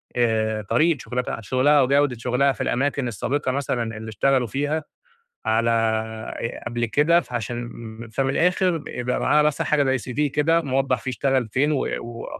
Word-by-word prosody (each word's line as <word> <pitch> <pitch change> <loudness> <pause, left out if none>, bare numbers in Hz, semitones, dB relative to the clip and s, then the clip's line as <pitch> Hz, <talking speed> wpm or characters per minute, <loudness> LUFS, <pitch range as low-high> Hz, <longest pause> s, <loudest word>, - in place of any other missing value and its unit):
آآ 110 -2 +1
طريقة 155 +10 +2
شغلتها 125 -2 -3
شغلها 130 +7 +3
وجودة 140 -1 +2
شغلها 125 +4 +2
في - - -4
الأماكن 140 0 0
السابقة 130 +6 -1
مثلًا 120 -5 -2
اللي 110 0 -7
اشتغلوا 130 +3 +1
فيها 145 +6 -1 0.6
على 115 +1 +2 0.7
آآ 115 - -5
قبل 120 0 -1
كده، 160 +8 +3
عشان 120 0 -4 0.4
فمن 135 +3 0
الآخر 175 +2 +1
يبقى 125 0 -2
معاها 150 0 +4
بس 150 -1 +1
حاجة 140 -3 +2
زي 125 0 -6
cv 145 0 0
كده 160 +3 +3
موضح 135 -1 0
فيه 130 - -4
اشتغل 130 -2 0
فين 140 +7 +1
و 140 - +1 0.2
و 115 0 -7
130 Hz, 160 wpm, -23 LUFS, 120-145 Hz, 0.7 s, معاها